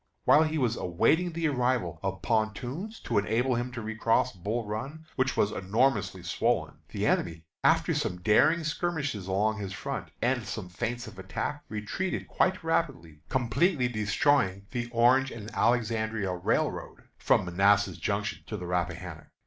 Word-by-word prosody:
While 155 Hz, -, +7 dB
he 155 Hz, 0 st, -1 dB
was 120 Hz, -5 st, +1 dB
awaiting 130 Hz, -, +2 dB
the 165 Hz, 0 st, 0 dB
arrival 125 Hz, -, 0 dB
of 95 Hz, 0 st, -3 dB
pontoons 125 Hz, -, -2 dB
to -, -, +1 dB
enable 115 Hz, +5 st, +1 dB
him 120 Hz, +1 st, -2 dB
to 115 Hz, -2 st, -5 dB
recross 115 Hz, +3 st, +1 dB
Bull 105 Hz, +6 st, -3 dB
Run, 135 Hz, +10 st, -5 dB
which 130 Hz, 0 st, 0 dB
was 105 Hz, -, +3 dB
enormously 100 Hz, -2 st, 0 dB
swollen, 85 Hz, -, 0 dB
the -, -, -2 dB
enemy, 80 Hz, -1 st, 0 dB, 0.2 s
after -, -, +4 dB
some 90 Hz, -, -1 dB
daring 110 Hz, -, +4 dB
skirmishes 150 Hz, -, -2 dB
along 105 Hz, +3 st, +1 dB
his 100 Hz, -2 st, -5 dB
front, -, -, -5 dB
and 125 Hz, 0 st, +1 dB
some 105 Hz, -5 st, -5 dB
feints 120 Hz, +6 st, -3 dB
of -, -, -11 dB
attack, 145 Hz, +10 st, -4 dB
retreated 110 Hz, -, -3 dB
quite 185 Hz, -2 st, +1 dB
rapidly, 135 Hz, -, -1 dB
completely 130 Hz, -, +2 dB
destroying 105 Hz, -2 st, +1 dB
the 120 Hz, -2 st, -3 dB
Orange 125 Hz, +3 st, +4 dB
and 110 Hz, -2 st, -8 dB
Alexandria 110 Hz, -4 st, +1 dB
Railroad 90 Hz, 0 st, -1 dB, 0.2 s
from -, -, +3 dB
Manassas 100 Hz, +3 st, +3 dB
Junction 100 Hz, 0 st, -2 dB
to 105 Hz, -, -4 dB
the 90 Hz, -, -6 dB
Rappahannock. 85 Hz, -1 st, -3 dB
115 Hz, 150 wpm, -29 LUFS, 100-130 Hz, 0.2 s, While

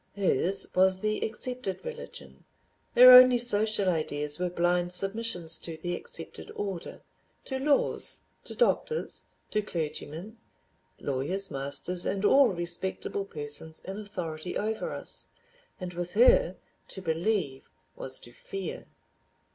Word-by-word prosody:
Hers 195 Hz, -1 st, +3 dB
was 185 Hz, 0 st, +5 dB
the 215 Hz, 0 st, -1 dB
accepted 245 Hz, -, -5 dB
religion, 485 Hz, 0 st, -9 dB, 0.5 s
her 250 Hz, +1 st, +10 dB
only 250 Hz, 0 st, +9 dB
social 215 Hz, -4 st, +1 dB
ideas 150 Hz, -3 st, -1 dB
were 180 Hz, 0 st, -1 dB
blind 175 Hz, 0 st, 0 dB
submissions 195 Hz, -3 st, +2 dB
to 165 Hz, -2 st, -7 dB
the 175 Hz, +2 st, -3 dB
accepted 165 Hz, -1 st, -7 dB
order—to 205 Hz, +6 st, -7 dB
laws, 285 Hz, +1 st, 0 dB, 0.2 s
to -, -, -6 dB
doctors, 475 Hz, -1 st, 0 dB, 0.3 s
to 210 Hz, -, +1 dB
clergymen, 170 Hz, +3 st, -6 dB, 0.6 s
lawyers, 145 Hz, +9 st, -2 dB
masters, 140 Hz, +6 st, -1 dB
and 200 Hz, +1 st, -1 dB
all 270 Hz, +3 st, +6 dB
respectable 175 Hz, +3 st, -3 dB
persons 150 Hz, -1 st, -5 dB
in 195 Hz, +2 st, -7 dB
authority 180 Hz, -5 st, -5 dB
over 220 Hz, +1 st, -3 dB
us, -, -, -4 dB, 0.5 s
and 180 Hz, -2 st, -6 dB
with 175 Hz, 0 st, -5 dB
her 255 Hz, -, +5 dB, 0.3 s
to 190 Hz, -, -6 dB
believe 165 Hz, -4 st, -2 dB, 0.3 s
was 130 Hz, -, -2 dB
to 120 Hz, -, -13 dB
fear. 195 Hz, +6 st, -7 dB
185 Hz, 120 wpm, -28 LUFS, 165-215 Hz, 0.6 s, her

